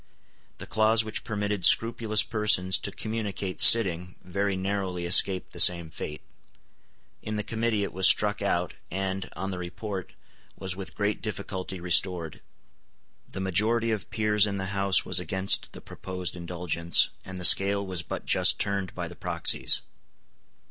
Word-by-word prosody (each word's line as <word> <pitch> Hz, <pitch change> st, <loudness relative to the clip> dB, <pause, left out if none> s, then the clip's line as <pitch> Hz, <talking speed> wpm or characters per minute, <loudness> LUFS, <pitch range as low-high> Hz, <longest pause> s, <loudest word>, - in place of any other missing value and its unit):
The -, -, -10 dB
clause 110 Hz, +1 st, +2 dB
which 110 Hz, 0 st, -6 dB
permitted 105 Hz, -3 st, -4 dB
scrupulous 110 Hz, -2 st, +4 dB
persons 95 Hz, -4 st, +1 dB
to 100 Hz, -, -5 dB
communicate 105 Hz, -3 st, -3 dB
sitting 90 Hz, -5 st, +6 dB
very 100 Hz, +1 st, -3 dB
narrowly 95 Hz, -2 st, -4 dB
escaped 90 Hz, +1 st, +3 dB
the -, -, -9 dB
same 85 Hz, -3 st, +5 dB
fate. 75 Hz, 0 st, -8 dB, 1.0 s
In 110 Hz, -, -6 dB
the 105 Hz, -, -3 dB
Committee 110 Hz, -1 st, -2 dB
it -, -, -6 dB
was 95 Hz, 0 st, +4 dB
struck 105 Hz, +2 st, +2 dB
out, 90 Hz, -3 st, -2 dB, 0.2 s
and, 95 Hz, +1 st, -4 dB
on 95 Hz, +2 st, -5 dB
the 90 Hz, -, -6 dB
report, 95 Hz, +2 st, -7 dB, 0.4 s
was 95 Hz, -1 st, -2 dB
with 95 Hz, 0 st, -8 dB
great 105 Hz, +1 st, -2 dB
difficulty 95 Hz, -3 st, -6 dB
restored. 85 Hz, -2 st, -1 dB, 0.9 s
The -, -, -7 dB
majority 110 Hz, +5 st, -1 dB
of 110 Hz, -2 st, -5 dB
peers 105 Hz, -2 st, +2 dB
in 100 Hz, -1 st, -4 dB
the 95 Hz, +1 st, -5 dB
House 100 Hz, -2 st, +1 dB
was 90 Hz, -, 0 dB
against 95 Hz, +3 st, -2 dB
the -, -, -11 dB
proposed 90 Hz, -1 st, -7 dB
indulgence, 85 Hz, -1 st, 0 dB
and 95 Hz, -1 st, -10 dB
the 90 Hz, -, -1 dB
scale 100 Hz, +2 st, +5 dB
was 90 Hz, -3 st, -4 dB
but -, -, -7 dB
just -, -, +4 dB
turned 100 Hz, -3 st, -3 dB
by -, -, -5 dB
the -, -, -12 dB
proxies. -, -, +2 dB
95 Hz, 155 wpm, -26 LUFS, 90-105 Hz, 1.0 s, sitting